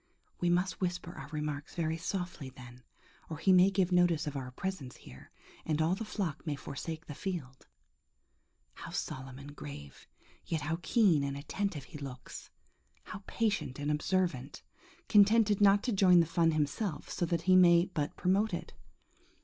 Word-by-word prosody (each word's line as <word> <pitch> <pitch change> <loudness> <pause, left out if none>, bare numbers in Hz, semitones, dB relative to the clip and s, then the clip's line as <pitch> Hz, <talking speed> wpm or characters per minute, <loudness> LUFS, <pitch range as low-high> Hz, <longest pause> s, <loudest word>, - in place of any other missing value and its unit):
We 175 - +1
must 180 +4 0
whisper 175 -1 -2
our - - -9
remarks 150 -1 -5
very 160 -2 -1
softly 180 -4 -4
then, 125 -1 -13 0.5
or 160 - -5
he 185 +4 +4
may 185 +1 +7
give 190 -2 +1
notice 175 -3 +3
of 145 -1 -4
our 130 -2 -4
presence 145 -2 -5
here, 65 - -14 0.3
and 155 -1 -1
all 160 +3 +2
the 195 - -3
flock 185 -8 -3
may 150 - 0
forsake 160 +4 -6
the 150 - -7
field. 150 -7 -6 1.1
How - - -9
solemn 130 0 -5
and 145 +1 -10
grave, 70 - -10 0.4
yet 160 -2 -2
how 160 +3 -2
keen 175 -5 +3
and 140 0 -3
attentive 155 +1 -3
he 150 - -10
looks! 130 -3 -8 0.5
How 195 - -8
patient 210 - -1
and 145 +1 -1
observant! 150 -4 -1 0.4
Contented 210 0 +5
not 200 0 +5
to 250 - 0
join 185 -4 +6
the 170 - +4
fun 165 +1 +2
himself, 155 +3 -2
so 175 - -1
that 170 -1 -1
he 185 +1 +5
may 175 -1 +7
but 155 -6 -3
promote 190 +2 +2
it. - - -8
165 Hz, 165 wpm, -32 LUFS, 145-185 Hz, 1.1 s, may